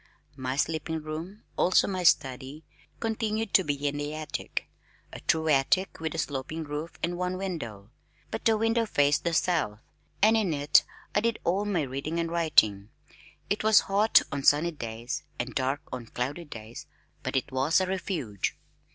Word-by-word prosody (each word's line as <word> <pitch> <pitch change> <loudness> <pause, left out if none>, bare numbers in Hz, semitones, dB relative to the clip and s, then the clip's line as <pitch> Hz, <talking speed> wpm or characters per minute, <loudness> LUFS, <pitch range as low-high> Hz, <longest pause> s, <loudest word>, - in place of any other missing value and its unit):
My 130 -1 -3
sleeping 160 +2 -1
room 165 +7 -6
(also 185 - +4
my 185 -2 -2
study), 135 -2 +1 0.3
continued 220 -1 -1
to 190 - +6
be 145 -2 -1
in 145 0 -1
the 145 +1 -3
attic 155 0 -4 0.5
(a - - -7
true 160 0 +1
attic 155 +6 +2
with 160 -1 -3
a - - -4
sloping 150 +1 -3
roof 150 +2 -5
and 175 +1 -1
one 180 0 -1
window) 120 - -5 0.4
but 225 - -4
the 225 -2 +4
window 225 +1 +1
faced 145 -5 +2
the 170 - +1
south, 160 - +1 0.4
and 220 +2 +5
in 195 -8 +1
it 145 0 +5 0.3
I - - +3
did 230 +1 0
all 190 +4 +1
my 190 -7 0
reading 140 +5 -3
and 165 0 -1
writing. 110 -12 +3 0.6
It 205 - -1
was 220 -1 +6
hot 205 +3 +4
on 140 -1 -2
sunny 150 +5 +4
days 115 -4 -5 0.2
and 120 0 -3
dark 135 +4 0
on 125 -2 -5
cloudy 140 +10 -3
days, 115 -5 -9 0.3
but - - -4
it 130 +1 0
was 135 +6 +3
a 185 - +1
refuge. 175 - -2
155 Hz, 170 wpm, -28 LUFS, 135-185 Hz, 0.6 s, to